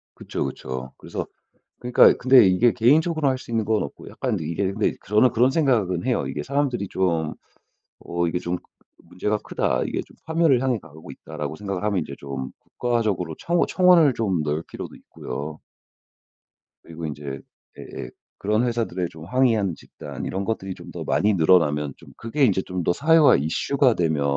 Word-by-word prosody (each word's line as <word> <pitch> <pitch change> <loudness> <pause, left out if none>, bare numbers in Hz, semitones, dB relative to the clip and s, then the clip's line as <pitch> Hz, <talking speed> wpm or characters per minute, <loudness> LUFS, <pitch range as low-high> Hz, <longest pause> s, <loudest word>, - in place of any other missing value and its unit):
그쵸, - - -4
그쵸. 65 0 -6
그래서 - - -5 0.6
그러니까 125 0 +6
근데 130 -4 +6
이게 95 +6 +4
개인적으로 150 +5 +3
할 130 -1 0
수 130 - -12
있는 115 -2 0
건 110 0 +1
없고 70 - -8
약간 - - -2
이게 90 +5 -2
근데 105 +1 0
저는 105 +5 +4
그런 125 +2 +4
생각은 115 - +1
해요. 125 -1 0
이게 - - -4
사람들이 135 -6 -1
좀 85 -5 0 0.7
'어 85 0 -2
이게 90 +2 -1
좀 90 0 -2 0.5
문제가 105 +4 -2
크다. - - -1
이게 - - -2
좀 - - -20
파멸을 160 -6 +3
향해 130 -4 0
가고 80 -5 -13
있다.'라고 75 - -6
생각을 100 0 -4
하면 105 -3 +1
이제 70 - -7
좀 70 -1 -6
국가적으로 105 -9 -2
청 170 0 0
청원을 180 -6 +5
좀 95 -8 0
넣을 75 +2 -2
필요도 - - -8
있고요. 75 +2 -7 1.2
그리고 85 0 -8
인제 70 -3 -6 0.4
예예 - - -8 0.3
그런 105 +3 +1
회사들에 115 -7 -1
좀 80 0 -12
항의하는 110 -5 +2
집단 70 -3 -9
이런 95 +1 -3
것들이 95 -3 -3
좀 - - -12
더 - - -6
많이 105 +1 +2
늘어나면 80 -5 +3
좀 - - -16
그게 115 +6 -1
인제 95 -5 +1
좀 90 -2 -4
더 - - +2
사회화 160 - +5
이슈가 125 - +1
되면 80 -7 0
100 Hz, 360 characters per minute, -23 LUFS, 80-125 Hz, 1.2 s, 그러니까